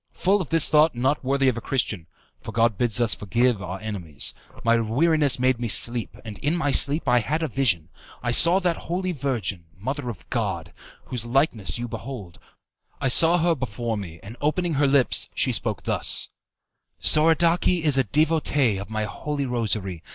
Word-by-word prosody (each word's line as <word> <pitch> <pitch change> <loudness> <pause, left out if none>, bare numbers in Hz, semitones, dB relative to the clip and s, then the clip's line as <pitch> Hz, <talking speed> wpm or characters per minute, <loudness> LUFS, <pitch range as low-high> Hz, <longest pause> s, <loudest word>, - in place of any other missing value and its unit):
Full 195 +2 +1
of 165 - -6
this 165 -2 +5
thought 155 -1 +3
not 135 +5 0
worthy 135 +1 +1
of 125 -2 +1
a - - -5
Christian 110 - -2 0.3
(for - - -8
God 115 -1 +1
bids 120 +2 0
us 120 -2 +3
forgive 120 +1 0
our 90 +1 -6
enemies) 90 -9 -3 0.3
my 115 0 +3
weariness 145 +6 +2
made 130 -1 +1
me 120 - -2
sleep, 115 -1 +1
and 105 -2 -8
in 155 +5 0
my 145 -4 0
sleep 145 +4 +2
I 125 - +4
had 155 +8 -2
a - - 0
vision. 105 - 0 0.3
I 120 - 0
saw 170 +9 +6
that 175 -3 0
Holy 185 +2 -2
Virgin, 120 - -3
Mother 130 +5 -4
of 100 -8 -9
God, - - -3 0.3
whose 120 -2 -5
likeness 120 -6 0
you 120 +1 -4
behold 115 -7 -8 0.6
I 135 - 0
saw 165 +6 +6
her 170 0 +2
before 120 -4 -4
me, 85 -6 -8
and 110 +4 -9
opening 165 +3 0
her 145 0 +2
lips 135 -2 +2
she - - +1
spoke - - -2
thus: - - +2 0.7
"'Soradaci 165 +2 +3
is 150 -3 +4
a 135 - +3
devotee 145 -3 +1
of 100 - -8
my 110 -1 -2
Holy 140 +6 -4
Rosary. 105 -8 -3
125 Hz, 180 wpm, -23 LUFS, 110-150 Hz, 0.7 s, saw